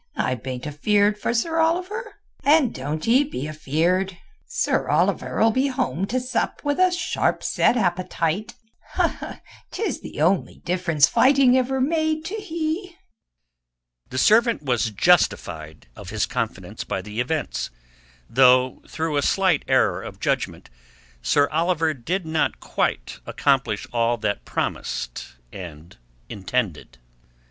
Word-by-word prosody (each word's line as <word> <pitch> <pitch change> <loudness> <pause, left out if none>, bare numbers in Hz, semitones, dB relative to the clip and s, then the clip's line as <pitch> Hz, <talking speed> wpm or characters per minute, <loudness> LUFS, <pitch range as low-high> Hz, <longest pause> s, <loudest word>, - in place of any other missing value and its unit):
I 130 - +1
bain't 125 +1 -6
afeeard 205 +8 +2
for - - -1
Sir 325 +8 0
Oliver, 365 +8 -1 0.3
and 290 -3 +4
doan't 150 +6 -4
ee 255 +5 +5
be 150 - -5
afeeard. 170 +5 0 0.3
Sir 485 - 0
Oliver'll 225 0 +2
be 260 +5 +1
home 255 - -1
to 255 +5 0
sup 250 0 -2
with 290 +1 -1
a 370 0 +5
sharp 345 -1 -1
set 245 - +2
appetite—'tis 180 0 -1 1.5
the - - -8
only 175 +5 +1
difference 170 -5 +3
fighting 265 -2 +5
ever 260 +1 +1
made 315 +2 0
to 370 - -5
he." 340 -3 -3 1.1
The 130 - -6
servant 225 - +4
was 120 -5 +1
justified 85 - +1
of - - -10
his - - 0
confidence - - -4
by 95 - -4
the 105 +2 -6
events, 150 +5 -2 0.6
though 130 0 +4
through 160 -2 -2
a - - +3
slight 185 -1 +2
error - - +2
of - - -9
judgment - - -2 0.5
Sir 145 - +3
Oliver 165 0 +1
did 165 +8 -3
not 160 -1 0
quite - - -2
accomplish 125 -7 +1
all 120 0 +2
that 105 -2 -2
promised - - -4 0.2
and 85 -3 -10 0.3
intended. 100 - -3
175 Hz, 125 wpm, -23 LUFS, -, 1.5 s, ee